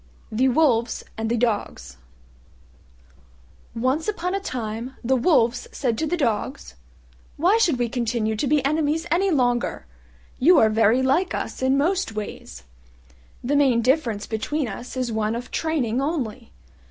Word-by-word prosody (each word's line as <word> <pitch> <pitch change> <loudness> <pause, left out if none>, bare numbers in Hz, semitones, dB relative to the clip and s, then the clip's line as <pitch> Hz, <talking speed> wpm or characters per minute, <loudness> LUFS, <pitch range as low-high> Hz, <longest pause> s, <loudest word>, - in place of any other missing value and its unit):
THE 255 +5 +2
WOLVES 245 -5 +2
AND 225 0 -3
THE 235 - +1
DOGS 215 - -2 1.8
Once 260 - 0
upon 365 -4 -2
a 395 - 0
time 240 - -5
the 260 +3 +2
Wolves 245 -3 +2
said 245 -5 -1
to 315 - 0
the 350 - -1
Dogs, 255 - -2 0.6
"Why 370 +9 +3
should 335 - +3
we 240 -1 0
continue 230 -2 -1
to 245 +7 -1
be 290 -1 +2
enemies 305 +2 0
any 380 +4 +2
longer? 245 - 0 0.5
You 340 +7 +6
are 220 -1 +5
very 225 +3 +3
like 325 +8 +1
us - - -5
in 260 +1 +2
most 350 -2 0
ways: 205 - -7 0.8
the 275 +4 0
main 260 -5 +3
difference 245 -5 +1
between 255 +6 -2
us 240 +4 -7
is 250 -2 -1
one 220 0 -1
of 245 +1 -6
training 270 -7 -1
only. 260 -7 -3
255 Hz, 150 wpm, -23 LUFS, 230-300 Hz, 1.8 s, You